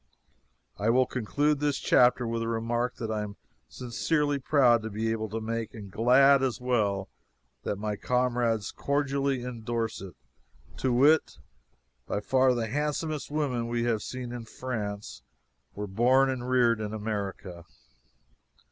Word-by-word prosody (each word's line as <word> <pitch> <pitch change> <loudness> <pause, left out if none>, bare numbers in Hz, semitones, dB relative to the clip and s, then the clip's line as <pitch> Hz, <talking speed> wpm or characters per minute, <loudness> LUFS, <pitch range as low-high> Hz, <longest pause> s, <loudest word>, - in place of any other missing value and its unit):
I 105 +2 +1
will 130 +2 +4
conclude 145 +5 0
this 145 -1 0
chapter 125 0 +4
with 115 0 -2
a 115 - -2
remark 120 +2 -1
that 115 -2 -4
I 110 -1 -1
am 105 -1 -6 0.3
sincerely 145 +4 -1
proud 125 -4 +4
to 110 - -5
be 110 +2 -2
able 110 -1 -2
to 110 +2 -3
make 115 0 -4
and 100 -3 -9
glad, 130 +6 +5
as 130 -5 -1
well, 105 -6 0 0.5
that - - -2
my 105 +1 -3
comrades 120 -3 0
cordially 140 -2 -1
endorse 115 -3 -3
it, 95 -4 -9 0.6
to 130 - 0
wit: 145 +6 +4 0.7
by - - -1
far 130 +3 +3
the 115 -1 -1
handsomest 150 +4 -2
women 140 -6 -1
we 120 0 -1
have 115 -3 0
seen 125 +1 -6
in 120 -1 -6
France 105 - -5 0.5
were 105 - -4
born 125 +7 +3
and 125 -1 -4
reared 120 -3 +3
in 105 0 -4
America. 100 -5 -5
120 Hz, 150 wpm, -28 LUFS, 110-130 Hz, 0.7 s, glad